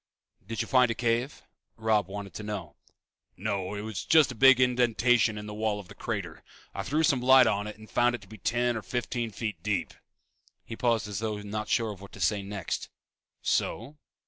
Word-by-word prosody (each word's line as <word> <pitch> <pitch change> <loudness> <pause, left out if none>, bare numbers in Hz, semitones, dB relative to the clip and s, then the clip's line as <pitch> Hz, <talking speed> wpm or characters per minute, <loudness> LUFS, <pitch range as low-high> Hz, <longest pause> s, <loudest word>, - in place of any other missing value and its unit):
"Did 115 -1 -2
you - - -9
find 125 -2 +4
a 115 - -1
cave?" 120 +4 -1 0.3
Robb 110 -3 +2
wanted 100 0 -7
to - - -6
know. 105 -5 -6 0.6
"No, 100 0 -2
it 105 - -4
was 110 -3 -5
just 155 -5 +5
a - - -5
big 135 +2 +6
indentation 125 -3 +3
in 105 - -6
the 105 - -7
wall 105 -1 -1
of 100 - -11
the - - -10
crater. - - -5 0.3
I - - -3
threw 145 +11 0
some 140 -5 +3
light 130 0 +7
on 105 +1 0
it 105 - -8
and 110 0 -13
found 120 +2 +2
it 120 - -9
to 100 - -15
be 110 +1 -12
ten 120 +3 +1
or 110 - -3
fifteen 120 +2 -3
feet 105 -4 -5
deep." 105 +1 -1 0.7
He 115 - -7
paused 115 -2 +1
as 100 -2 -4
though 110 -2 -2
not 105 +1 -4
sure 115 -2 +1
of 100 -2 -10
what 100 - -12
to - - -11
say 100 +4 +1
next. 100 -3 -4 0.5
"So?" 140 +7 -1
110 Hz, 210 wpm, -28 LUFS, 105-120 Hz, 0.7 s, light